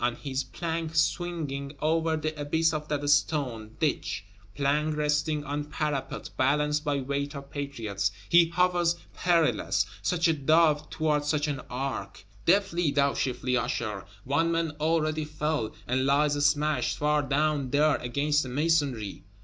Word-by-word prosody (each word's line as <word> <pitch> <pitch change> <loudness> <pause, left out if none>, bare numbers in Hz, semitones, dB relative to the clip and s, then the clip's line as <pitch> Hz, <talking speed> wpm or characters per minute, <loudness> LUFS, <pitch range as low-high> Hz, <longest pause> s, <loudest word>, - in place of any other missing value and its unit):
On 120 0 +1
his 135 0 -3
plank 165 -1 -4
swinging 155 -5 -1
over 160 +1 +1
the 155 0 -3
abyss 160 +2 +1
of 150 -1 -3
that 145 -1 -2
stone 130 -7 +1
Ditch; 115 -9 -1 0.3
plank 150 +2 +1
resting 150 0 0
on 145 +1 -3
parapet, 150 -2 -3
balanced 150 +3 +2
by 145 -2 0
weight 140 +2 -3
of 140 0 -9
Patriots, 115 -9 -2 0.2
he 170 -1 +6
hovers 175 -1 +2 0.2
perilous; 170 -3 +2 0.2
such 175 -1 +1
a 165 - +3
Dove 155 0 +3
toward 150 -2 0
such 150 0 +1
an 140 -3 -3
Ark! 125 -8 -4 0.2
Deftly, 175 -3 +3
thou 140 0 +2
shifty 125 -1 -1
Usher; 110 -5 -2 0.2
one 155 +5 +1
man 165 -1 0
already 155 0 +1
fell; 150 -6 -2
and 130 +1 +1
lies 145 +1 +3
smashed, 150 -4 0
far 150 0 +2
down 145 -1 0
there, 150 +3 +3
against 145 +5 0
the 130 - -5
masonry! 140 -7 0
150 Hz, 145 wpm, -28 LUFS, 140-155 Hz, 0.3 s, he